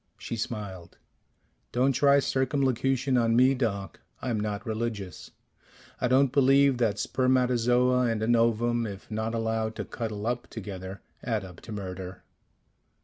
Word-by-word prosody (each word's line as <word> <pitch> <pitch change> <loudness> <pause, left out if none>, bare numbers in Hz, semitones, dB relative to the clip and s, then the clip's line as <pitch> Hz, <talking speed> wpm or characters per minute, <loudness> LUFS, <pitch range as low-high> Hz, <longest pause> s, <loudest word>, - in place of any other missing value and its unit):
She - - -5
smiled. 105 -6 -6 0.7
"Don't 130 +3 +2
try 140 +2 +4
circumlocution 130 -1 +1
on 115 -1 +2
me, 130 +2 +5
Doc. 105 -7 -3 0.2
I'm 120 -4 -2
not 105 0 -3
religious. 110 -4 -4 0.7
I 125 - +1
don't 130 +1 +4
believe 135 -1 +4
that 110 -4 +1
spermatozoa 125 +1 +2
and 110 -1 -1
an 120 +2 +3
ovum, 115 0 +2
if 100 +1 -9
not 110 +1 -2
allowed 110 -1 -1
to - - -4
cuddle 110 -3 -5
up 120 +1 -2
together, 95 -3 -7 0.2
add 110 -5 -1
up 90 -2 -12
to - - -10
murder." 95 -2 -6
115 Hz, 140 wpm, -27 LUFS, 105-125 Hz, 0.7 s, me